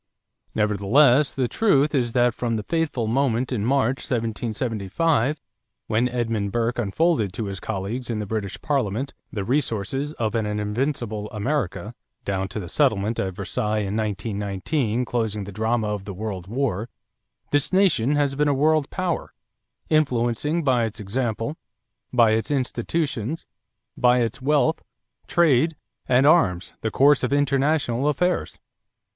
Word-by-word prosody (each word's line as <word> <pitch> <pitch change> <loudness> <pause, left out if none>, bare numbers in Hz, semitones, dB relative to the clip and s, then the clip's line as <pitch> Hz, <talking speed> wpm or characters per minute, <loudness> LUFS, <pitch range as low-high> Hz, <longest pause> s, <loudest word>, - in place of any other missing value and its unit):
Nevertheless, 120 +7 +4
the 130 -2 -1
truth 150 - +2
is 120 -4 0
that 120 -1 +3
from 115 0 -2
the 105 - -2
fateful 160 -5 -1
moment 125 +1 +1
in 115 -5 -1
March, 130 +1 +2
1775, 115 - -1 0.5
when 115 +3 +1
Edmund 115 -4 -1
Burke 120 +2 0
unfolded 120 - +1
to 110 - -3
his 100 -1 -5
colleagues 110 +5 -4
in 115 - -1
the 105 - -3
British 100 -2 -4
Parliament 135 -2 -1 0.2
the 100 - -3
resources 135 +3 -1
of 110 -7 -2
an 110 -2 0
invincible 105 +1 -2
America, 105 - -2 0.3
down 95 -1 -1
to 100 - -5
the 90 - -6
settlement 110 - +1
at 95 -2 -2
Versailles 105 +2 -1
in 100 +2 -3
1919 105 - -1
closing 110 -4 -1
the 100 - -8
drama 110 +1 0
of 105 -2 -4
the 100 -2 -6
World 95 -3 -5
War, 115 -2 -2 0.6
this 145 -1 +1
nation 175 - +3
has 145 -2 +1
been 150 +2 +1
a 145 - +2
world 155 +1 +2
power, 185 -3 -3 0.5
influencing 150 +1 +1
by 125 -4 +3
its 110 - -6
example, 115 - -2 0.5
by 115 -3 +5
its 110 +1 0
institutions, 140 0 -2 0.5
by 125 0 +4
its 115 +3 -2
wealth, 150 +3 +2 0.5
trade, 160 -1 +3 0.3
and 130 +2 +4
arms 105 - +3
the 110 - -1
course 140 +5 +4
of 125 - 0
international 140 -2 +1
affairs. 180 +5 0
120 Hz, 140 wpm, -24 LUFS, 105-140 Hz, 0.6 s, by